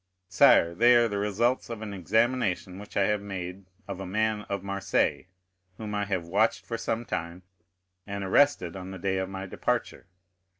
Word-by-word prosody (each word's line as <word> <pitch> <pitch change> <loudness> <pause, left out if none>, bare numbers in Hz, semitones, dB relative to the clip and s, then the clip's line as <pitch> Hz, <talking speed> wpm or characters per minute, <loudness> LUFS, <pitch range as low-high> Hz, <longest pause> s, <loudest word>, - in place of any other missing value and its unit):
"Sire, 85 -2 +5
they 120 +6 +5
are 120 0 +5
the 100 -2 -3
results 115 +6 0
of 115 -2 -6
an 105 -2 -6
examination 100 -1 0
which 105 - -8
I 100 - +4
have 105 0 0
made 95 -1 -6 0.2
of 100 -2 -6
a 95 - -5
man 110 +2 -1
of 100 -1 -3
Marseilles, 100 -2 0 0.5
whom 105 -1 -6
I 105 0 -1
have 95 -4 -2
watched 100 +6 +1
for 115 - -4
some 115 +1 -2
time, 85 0 -4 0.6
and 100 0 -4
arrested 95 -4 +2
on 95 -1 -7
the 95 - -7
day 95 +1 -1
of 95 0 -3
my 95 0 -6
departure. 95 - -2
100 Hz, 180 wpm, -27 LUFS, 95-110 Hz, 0.6 s, Sire